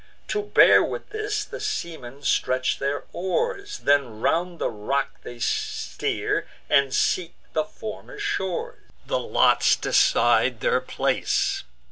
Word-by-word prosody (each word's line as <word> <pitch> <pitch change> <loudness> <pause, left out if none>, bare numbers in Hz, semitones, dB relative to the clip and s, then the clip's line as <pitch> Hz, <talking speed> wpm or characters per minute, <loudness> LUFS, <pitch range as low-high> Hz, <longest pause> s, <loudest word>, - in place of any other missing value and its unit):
To 420 - 0
bear 415 - +6
with - - -5
this, 420 -1 -2
the - - -8
seamen 160 - -5
stretch 130 -1 +1
their 140 +1 -1
oars; 405 - -2
Then 140 -6 +2
round 170 +7 0
the - - -1
rock 135 +7 -2
they 120 - -9
steer, 120 - -2 0.2
and 140 -1 +3
seek 175 +5 0 0.2
the 210 - +1
former 215 - -9
shores. 410 - -3 0.3
The - - 0
lots - - +4
decide 120 0 +3
their - - +2
place. 130 - 0
170 Hz, 125 wpm, -24 LUFS, -, 0.3 s, bear